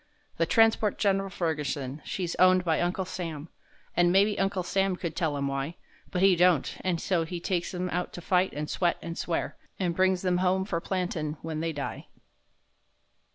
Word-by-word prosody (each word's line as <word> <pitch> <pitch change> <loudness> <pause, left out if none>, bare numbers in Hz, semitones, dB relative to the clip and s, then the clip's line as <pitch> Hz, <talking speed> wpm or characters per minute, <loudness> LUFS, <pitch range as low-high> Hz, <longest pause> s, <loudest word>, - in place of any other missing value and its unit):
The 165 - +1
transport 225 0 +3
Gen'ral 195 -1 +1
Ferguson, 150 -6 -2
she's 175 -3 -3
owned 185 0 +5
by 160 -2 +2
Uncle 180 +2 0
Sam, 165 -4 -5 0.5
An' 175 0 +4
maybe 200 +2 +3
Uncle 195 -1 0
Sam 195 +1 +1
could 170 -3 -5
tell 155 -4 0
'em 140 - -1
why, 140 +4 -3 0.3
But 180 - 0
he 195 -2 +6
don't—and 175 0 +2
so 175 -2 +1
he 170 +2 -5
takes 175 0 -1
'em 180 +1 -2
out 180 +1 -2
to 175 - -7
fight, 180 +2 +2
and 150 +1 -3
sweat, 175 +2 +1
and 165 0 -5
swear, 170 -1 -2 0.2
An' 180 -3 0
brings 185 +1 +2
them 180 -1 +2
home 185 +1 +1
for 170 -4 -2
plantin' 170 -5 -2
when 160 -1 -3
they 165 +1 -1
die. 145 -3 -5
175 Hz, 180 wpm, -28 LUFS, 165-185 Hz, 0.5 s, he